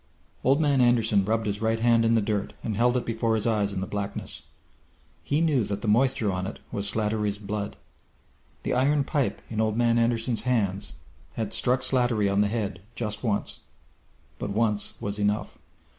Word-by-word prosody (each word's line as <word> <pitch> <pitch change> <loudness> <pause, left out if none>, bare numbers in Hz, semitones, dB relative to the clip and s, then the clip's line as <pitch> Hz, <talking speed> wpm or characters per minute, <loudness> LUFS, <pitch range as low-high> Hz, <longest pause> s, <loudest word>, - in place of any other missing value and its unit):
Old 135 +3 +4
Man 145 -4 +3
Anderson 115 -4 +3
rubbed 110 +2 0
his 105 0 -2
right 115 0 +1
hand 115 0 +4
in 115 0 +4
the 110 - +3
dirt 105 -1 -2
and 110 - -2
held 120 +3 +3
it 125 - -2
before 115 0 0
his 110 - 0
eyes 105 -3 +1
in 95 - -3
the - - -1
blackness. 100 0 -5 0.7
He 145 +3 0
knew 150 -7 +3
that 100 0 -4
the - - -2
moisture 115 -1 +3
on 90 0 -2
it 110 - -6
was 100 0 0
Slattery's 105 -1 0
blood. 105 0 -4 0.9
The - - -1
iron 140 +3 +3
pipe 135 -1 -1
in 110 -1 -2
Old 110 0 0
Man 120 -1 +3
Anderson's 115 0 +1
hands 100 - 0 0.4
had 110 +1 -3
struck 125 +1 +2
Slattery 120 -5 +2
on 100 +1 +3
the 105 - +3
head 100 -5 -3
just 105 -2 -4
once, 105 -4 -1 0.8
but - - -3
once 105 0 0
was 100 0 -3
enough. 105 +1 -1
110 Hz, 185 wpm, -26 LUFS, 105-120 Hz, 0.9 s, Old